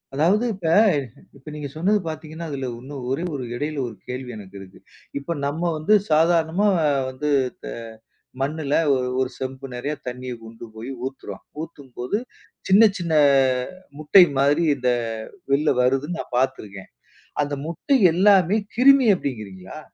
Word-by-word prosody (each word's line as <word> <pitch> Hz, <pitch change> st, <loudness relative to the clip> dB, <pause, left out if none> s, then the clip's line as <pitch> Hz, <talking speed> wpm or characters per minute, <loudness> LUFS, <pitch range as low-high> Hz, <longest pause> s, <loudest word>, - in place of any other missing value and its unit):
அதாவது 190 Hz, -, +3 dB
இப்ப, 180 Hz, -4 st, -5 dB, 0.7 s
இப்ப 135 Hz, -, -23 dB
நீங்க 150 Hz, -1 st, -5 dB
சொன்னது 205 Hz, +5 st, +2 dB
பார்த்தீங்கன்னா, 160 Hz, +1 st, -6 dB
அதில 135 Hz, -2 st, -3 dB
இன்னும் 135 Hz, 0 st, -8 dB
ஒரே 140 Hz, +6 st, -1 dB
ஒரு 135 Hz, -3 st, -4 dB
இடையில 150 Hz, +3 st, -3 dB
ஒரு 110 Hz, -, -9 dB
கேள்வி 125 Hz, 0 st, -5 dB
எனக்கு 100 Hz, -1 st, -12 dB
இருக்கு. 95 Hz, -1 st, -13 dB, 0.4 s
இப்ப 155 Hz, +4 st, -4 dB
நம்ம 155 Hz, +5 st, -3 dB
வந்து 155 Hz, +8 st, +2 dB, 0.2 s
சாதாரணமா 165 Hz, +4 st, +3 dB, 0.4 s
வந்து 145 Hz, +3 st, -3 dB, 0.3 s
த -, -, -8 dB, 0.8 s
மண்ணுல 145 Hz, 0 st, -2 dB, 0.2 s
ஒ -, -, +2 dB, 0.2 s
ஒரு 130 Hz, -1 st, 0 dB
செம்பு 130 Hz, +1 st, -6 dB
நெறைய 140 Hz, +5 st, -3 dB
தண்ணிய 125 Hz, 0 st, -5 dB
கொண்டுபோய் 115 Hz, +2 st, -9 dB
ஊத்துறோம். 135 Hz, 0 st, -7 dB, 0.2 s
ஊத்தும்போது 140 Hz, 0 st, -5 dB, 0.5 s
சின்ன, 195 Hz, +3 st, +6 dB, 0.2 s
சின்ன 170 Hz, -3 st, -2 dB, 0.9 s
முட்டை 165 Hz, +5 st, +7 dB, 0.2 s
மாதிரி 145 Hz, +4 st, +3 dB
இந்த 125 Hz, -1 st, 0 dB, 0.6 s
வெளில 150 Hz, +2 st, +3 dB
வருதுன்னு 135 Hz, +7 st, 0 dB
நான் 125 Hz, -, -5 dB
பார்த்துருக்கேன். 100 Hz, -6 st, -2 dB, 0.5 s
அந்த 145 Hz, 0 st, -4 dB
முட்டை 265 Hz, -, +1 dB, 0.2 s
எல்லாமே 195 Hz, +1 st, +4 dB, 0.2 s
கிருமி 265 Hz, 0 st, +6 dB
அப்பிடின்கிறீங்களா? 105 Hz, -, -6 dB
145 Hz, 130 wpm, -23 LUFS, 130-170 Hz, 0.9 s, முட்டை